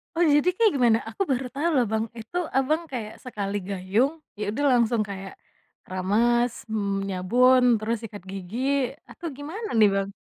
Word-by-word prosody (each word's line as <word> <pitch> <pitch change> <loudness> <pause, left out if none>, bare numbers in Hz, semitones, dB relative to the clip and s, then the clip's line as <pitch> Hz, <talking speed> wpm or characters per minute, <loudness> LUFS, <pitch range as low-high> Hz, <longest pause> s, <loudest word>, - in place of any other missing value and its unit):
Oh, - - -2
jadi 295 -1 +4
kayak 435 +3 +3
gimana? 235 -4 +4
Aku 225 - -7
baru 260 0 0
tau 310 +5 +1
loh 260 -6 +3
Bang, 220 0 +1
itu 225 +11 -6 0.2
Abang, 305 +5 +1
kayak 220 -4 -5
sekali 205 -5 -4
gayung, 200 - 0 0.3
ya - - -2
udah 285 +7 -1
langsung 235 -2 +3
kayak 195 -1 -7 0.5
keramas, 230 +6 +1
mmm, 200 -3 -2
nyabun, 245 +8 +4 0.2
terus 220 +2 -1
sikat 210 -2 -7
gigi 195 +4 -6 0.5
atau 340 - -7
gimana 360 +10 -6
nih, 215 - +7
Bang? 195 0 -1
230 Hz, 165 wpm, -25 LUFS, 200-265 Hz, 0.5 s, nih